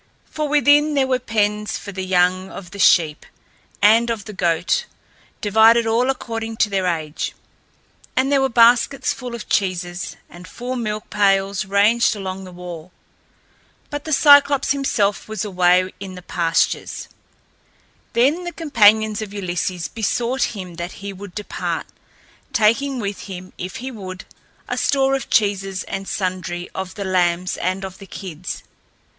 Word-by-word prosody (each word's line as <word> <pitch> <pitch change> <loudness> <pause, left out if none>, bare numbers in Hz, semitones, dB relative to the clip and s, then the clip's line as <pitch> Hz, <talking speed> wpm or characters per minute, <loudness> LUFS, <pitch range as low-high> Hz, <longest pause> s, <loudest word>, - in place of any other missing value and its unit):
For 305 -1 -3
within 295 +1 +4
there 275 -1 +3
were 260 -1 +1
pens 210 -3 -1
for 200 - -8
the 190 -1 -5
young 185 0 +2
of 185 -2 -10
the 200 - -9
sheep 160 -5 +4 0.6
and 225 +3 +5
of 225 -3 -3
the 215 - -8
goats, 170 -2 +1 0.6
divided 220 +3 +5
all 235 +3 +2
according 225 -3 -3
to 210 - +2
their 190 -2 0
age, 160 -3 -3 0.8
and 265 +2 +2
there 275 -1 +4
were 270 - +2
baskets 240 +3 +4
full 250 -3 -7
of 230 - -8
cheeses, 180 -2 -1
and 175 +1 -13
full 250 +5 -5
milk 215 -3 -4
pails 195 -1 +2
ranged 210 +4 +3
along 190 -1 -5
the 185 - -10
wall. 175 -1 -9 1.0
But 290 -1 -5
the 315 - -4
Cyclops 285 -2 +6
himself 225 -8 0
was 220 0 -3
away 185 -1 +3
in 190 -1 -7
the 180 - -10
pastures. 165 -2 -1 1.1
Then 280 +9 +2
the 350 - -4
companions 220 -8 +3
of 205 -1 -7
Ulysses 180 -2 -2
besought 240 +3 -1
him 180 -3 -8
that 175 +1 -5
he 200 0 -7
would 195 -1 -10
depart, 210 -1 -3 0.7
taking 255 +5 +2
with 205 -4 -4
him, 185 -1 -8
if 185 +1 -5
he 260 +2 -5
would, 185 -5 -8 0.4
a - - -2
store 270 -1 +2
of 270 - -5
cheeses 195 -3 +1
and 195 0 -5
sundry 180 -2 -3
of 190 -1 -5
the 200 - -4
lambs 180 -1 +1
and 185 +1 -2
of 190 0 -9
the 195 - -11
kids. 180 -3 -7
205 Hz, 155 wpm, -21 LUFS, 185-235 Hz, 1.1 s, Cyclops